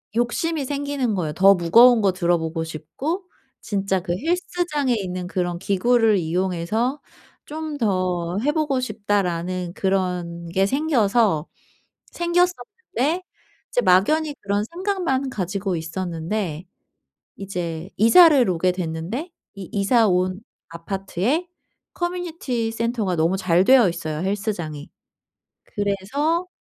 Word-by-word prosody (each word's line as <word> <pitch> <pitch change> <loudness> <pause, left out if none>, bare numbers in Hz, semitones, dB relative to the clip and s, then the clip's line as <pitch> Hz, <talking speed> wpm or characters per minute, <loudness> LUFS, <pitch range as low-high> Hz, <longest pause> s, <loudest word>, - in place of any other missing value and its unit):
욕심이 280 +7 0
생기는 280 -4 -2
거예요. 160 -5 -2
더 195 +4 +6
무거운 230 +8 +6
거 195 -2 +2
들어보고 170 -2 0
싶고 265 - -5 0.4
진짜 195 -2 -1
그 175 -1 -2
헬스장에 330 - -1
있는 185 -3 -4
그런 175 -1 -2
기구를 220 +3 +3
이용해서 185 - -1 0.4
'좀 310 0 -5
더 185 -6 -1
해 290 +5 +2
보고 295 -5 0
싶다.'라는 185 -6 -2
그런 180 -3 -2
게 190 +3 +2
생겨서 225 - +2 0.6
생겼었는데 355 - -1 0.5
이제 - - +2
막연히 300 - +3
그런 200 +1 0
생각만 340 - -2
가지고 195 -3 -2
있었는데, 170 +1 -4 0.7
이제 175 -3 -5
이사를 270 - +6
오게 180 +1 +1
됐는데 180 - -4 0.2
이 195 -3 -8
이사 215 +3 +3
온 185 +1 0 0.3
아파트에 195 - -2 0.5
커뮤니티 335 -10 -3
센터가 225 -4 -1
너무 165 +4 +2
잘 180 -1 +3
되어 250 -3 +6
있어요, 155 -3 -4
헬스장이. 190 -7 -3 0.8
그래서 265 - -1
200 Hz, 260 characters per minute, -22 LUFS, 180-270 Hz, 0.8 s, 더